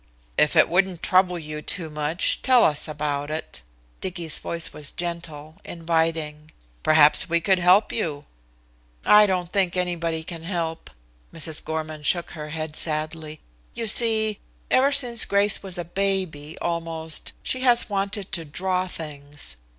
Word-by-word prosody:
"If 150 Hz, -, +3 dB
it 155 Hz, -, +6 dB
wouldn't 180 Hz, 0 st, +1 dB
trouble 185 Hz, -1 st, +3 dB
you 155 Hz, -2 st, -6 dB
too 170 Hz, +1 st, -2 dB
much, 150 Hz, +4 st, 0 dB
tell 255 Hz, -3 st, +5 dB
us 150 Hz, -2 st, +3 dB
about 145 Hz, -1 st, -3 dB
it." 155 Hz, -, -5 dB, 0.4 s
Dicky's 170 Hz, -4 st, -4 dB
voice 170 Hz, -1 st, -2 dB
was 150 Hz, -2 st, -5 dB
gentle, 165 Hz, -3 st, -6 dB
inviting. 160 Hz, -2 st, -2 dB, 0.3 s
"Perhaps 155 Hz, +1 st, +5 dB
we 170 Hz, 0 st, +3 dB
could 185 Hz, +3 st, +2 dB
help 180 Hz, +4 st, +4 dB
you." 150 Hz, -9 st, -3 dB, 0.8 s
"I 210 Hz, 0 st, +7 dB
don't 180 Hz, -2 st, -2 dB
think 185 Hz, -2 st, +1 dB
anybody 170 Hz, -3 st, -1 dB
can 165 Hz, 0 st, -7 dB
help." 165 Hz, -2 st, -4 dB, 0.4 s
Mrs. 160 Hz, -1 st, -4 dB
Gorman 155 Hz, -1 st, -4 dB
shook 170 Hz, +3 st, 0 dB
her 150 Hz, -2 st, -7 dB
head 155 Hz, 0 st, -5 dB
sadly. 155 Hz, 0 st, -3 dB, 0.3 s
"You 230 Hz, -, -3 dB
see, 220 Hz, -1 st, +2 dB, 0.3 s
ever 270 Hz, +2 st, +4 dB
since 245 Hz, -5 st, +3 dB
Grace 200 Hz, +1 st, +2 dB
was 190 Hz, -3 st, -6 dB
a 175 Hz, -, -4 dB
baby, 180 Hz, -5 st, -2 dB
almost, 165 Hz, -2 st, -2 dB
she 260 Hz, -, -2 dB
has 245 Hz, -2 st, +3 dB
wanted 200 Hz, -1 st, -3 dB
to 170 Hz, -1 st, -3 dB
draw 185 Hz, +4 st, -2 dB
things. 145 Hz, -, -7 dB
165 Hz, 145 wpm, -24 LUFS, 155-190 Hz, 0.8 s, I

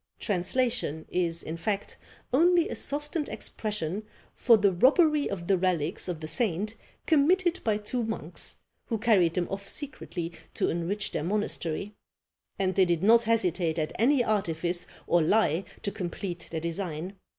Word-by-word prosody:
Translation 205 Hz, -, 0 dB
is, 170 Hz, -2 st, 0 dB
in 160 Hz, +2 st, -5 dB
fact, 200 Hz, +3 st, -2 dB, 0.4 s
only 340 Hz, +4 st, +5 dB
a -, -, -4 dB
softened 295 Hz, +2 st, -2 dB
expression 210 Hz, -3 st, -3 dB, 0.3 s
for 235 Hz, -3 st, +5 dB
the 200 Hz, -1 st, +3 dB
robbery 295 Hz, -, +4 dB
of 180 Hz, -4 st, -4 dB
the 190 Hz, 0 st, +2 dB
relics 175 Hz, -4 st, 0 dB
of 170 Hz, -3 st, -4 dB
the 155 Hz, -, -5 dB
saint 200 Hz, +5 st, -1 dB, 0.3 s
committed 345 Hz, +4 st, +3 dB
by 215 Hz, -2 st, +2 dB
two 215 Hz, +4 st, -3 dB
monks, 220 Hz, 0 st, -3 dB, 0.3 s
who 230 Hz, -, -1 dB
carried 205 Hz, -7 st, +3 dB
them 175 Hz, -1 st, 0 dB
off 195 Hz, 0 st, -5 dB
secretly 185 Hz, -, -4 dB, 0.2 s
to -, -, +1 dB
enrich 175 Hz, +5 st, -2 dB
their -, -, -2 dB
monastery; 200 Hz, 0 st, -2 dB, 0.6 s
and 190 Hz, -1 st, +1 dB
they 190 Hz, -, +4 dB
did 170 Hz, -1 st, 0 dB
not 230 Hz, +3 st, +6 dB
hesitate 180 Hz, -7 st, +1 dB
at 155 Hz, -1 st, -1 dB
any 255 Hz, +3 st, +4 dB
artifice 175 Hz, -5 st, -1 dB, 0.2 s
or 175 Hz, -, +3 dB
lie 170 Hz, -1 st, +3 dB, 0.2 s
to 200 Hz, -, -1 dB
complete 175 Hz, -1 st, -5 dB
their 160 Hz, -1 st, -3 dB
design. 170 Hz, +1 st, -4 dB
195 Hz, 150 wpm, -28 LUFS, 170-230 Hz, 0.6 s, not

